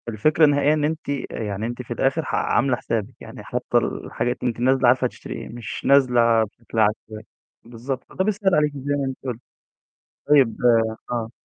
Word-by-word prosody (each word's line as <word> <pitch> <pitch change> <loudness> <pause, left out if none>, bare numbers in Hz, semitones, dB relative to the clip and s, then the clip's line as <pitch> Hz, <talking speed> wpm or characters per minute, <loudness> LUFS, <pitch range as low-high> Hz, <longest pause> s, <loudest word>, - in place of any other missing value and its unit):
الفكرة 155 +9 +3
النهائية 145 0 +3
إن 155 -1 0
أنتِ 155 0 -2
آآ 140 -4 -4
يعني 105 0 -3
أنتِ 120 +2 -5
في 120 -1 -6
الآخر 135 +6 0
ح - - -2
عاملة 135 -2 +1
حسابِك، 115 0 -3
يعني - - -10
حاطة - - -1
الحاجات 120 +1 -2
وأنتِ 120 -2 -1
نازلة 130 +1 +3
عارفة 125 +1 +4
هتشتري 125 - -6
إيه، - - -7
مش 115 -2 -7
نازلة 120 -4 +4
بشكل 115 +1 -6
عشوائي، 110 0 -1 0.4
بالضبط، 120 +3 -6
فده 190 - -2
بيسهل 200 -3 +1
عليكِ 150 -1 +2
زي 145 +1 -2
ما 140 -1 -1
أنتِ 130 -1 -4
قُلتِ. 125 -4 -4 0.9
طيب 135 -7 +4 0.6
آه. 115 -2 -2
125 Hz, 180 wpm, -22 LUFS, 115-145 Hz, 0.9 s, عارفة